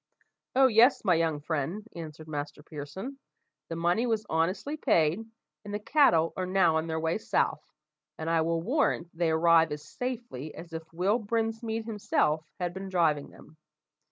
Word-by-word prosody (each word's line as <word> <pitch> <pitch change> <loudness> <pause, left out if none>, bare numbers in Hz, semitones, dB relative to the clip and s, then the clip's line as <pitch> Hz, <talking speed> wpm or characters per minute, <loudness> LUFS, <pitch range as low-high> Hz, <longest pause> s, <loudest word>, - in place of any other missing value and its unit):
"Oh, 265 +1 +6
yes, 240 0 +5
my 185 - +5
young 160 -3 +1
friend," 165 +8 -3
answered 155 -2 -8
Master 145 -1 -5
Pearson, 160 - -7 0.5
"the 165 - -3
money 175 +8 +1
was 220 -2 0
honestly 185 - 0
paid, 170 - +2 0.4
and 205 - -8
the 205 - -1
cattle 205 - +4
are 185 -1 -2
now 180 -4 +3
on 160 +1 -1
their 160 0 -2
way 165 +5 0
south, - - 0 0.6
and 160 - -5
I 165 0 +3
will 165 0 0
warrant 215 - 0
they 170 0 +1
arrive 165 0 +4
as 150 0 -5
safely 235 - -5
as 170 0 -10
if 160 0 -7
Will 190 +7 +1
Brinsmead 225 0 -2
himself 180 -8 0 0.2
had 175 -1 -2
been 190 +1 -6
driving 160 -6 +1
them. 155 - -17
170 Hz, 165 wpm, -29 LUFS, 160-220 Hz, 0.6 s, Oh